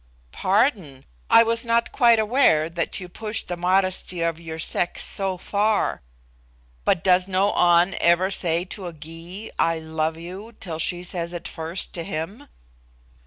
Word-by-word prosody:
"Pardon: 190 - 0 0.2
I 230 - +8
was 230 0 0
not 235 0 +1
quite 235 -3 +5
aware 215 - +3
that 165 +3 -2
you 180 - -7
pushed 215 +4 -3
the 175 - -3
modesty 185 0 +1
of 165 -1 -1
your 160 -1 -7
sex 175 +2 -1
so 195 -2 -1
far. 205 +3 0 0.8
But 170 - +2
does 185 0 +4
no 195 +1 +1
An 175 +1 +4
ever 175 +3 +3
say 170 -2 +1
to 190 0 -7
a 170 - -7
Gy, 165 +6 -9
'I 165 0 +2
love 160 0 -2
you,' 190 +7 -9
till 165 -5 -5
she 175 +2 0
says 175 -1 -4
it 175 - -6
first 165 +3 -4
to 170 - -4
him?" 195 - -6
180 Hz, 160 wpm, -23 LUFS, 165-200 Hz, 0.8 s, I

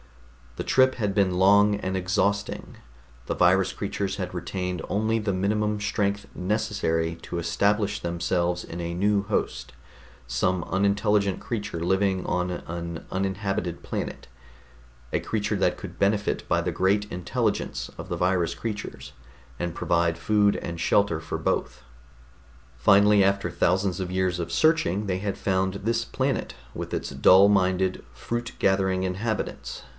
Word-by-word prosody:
The - - -2
trip 130 0 +4
had 105 -5 -1
been 95 -3 +2
long 100 +2 +5
and 95 -2 -3
exhausting; 100 +2 -1 0.5
the - - -1
virus 95 +1 +4
creatures 100 -1 -3
had 90 -2 -4
retained 90 -1 -3
only 110 +2 +1
the 105 -2 -1
minimum 105 +2 0
strength 100 -1 -1
necessary 90 -5 -1
to - - -5
establish 100 +5 +1
themselves 85 +1 -1
in 85 +1 -6
a 85 0 -3
new 100 +2 +2
host, 105 +1 -2 0.5
some 85 +9 0
unintelligent 100 0 +1
creature 105 -6 -4
living 95 +2 +1
on 90 0 0
an 85 -1 -5
uninhabited 95 -2 -2
planet, - - -5 0.9
a - - +2
creature 105 -1 -1
that 90 -2 +1
could 90 -3 -9
benefit 100 +1 +1
by 85 - +3
the 90 +1 -2
great 100 +4 +1
intelligence 90 -1 -2
of - - -8
the - - -2
virus 90 -1 +1
creatures, 100 - -6 0.4
and 85 -1 -3
provide 85 -1 +1
food 105 +2 +2
and 85 -1 -5
shelter 95 -6 +2
for 80 - -4
both. 65 -1 -2 0.9
Finally, 100 +9 +5
after 100 -1 +1
thousands 95 +2 +1
of 90 -1 -4
years 95 -1 0
of 85 - -4
searching, 105 - +2
they 95 -2 -1
had 100 0 -3
found 95 0 0
this 115 +3 -1
planet 130 +4 -2 0.2
with - - -6
its - - -3
dull 95 +2 +6
minded, 95 -2 +2
fruit 120 - -4
gathering 95 -1 +2
inhabitants. 100 +4 -3
95 Hz, 140 wpm, -26 LUFS, 90-105 Hz, 0.9 s, dull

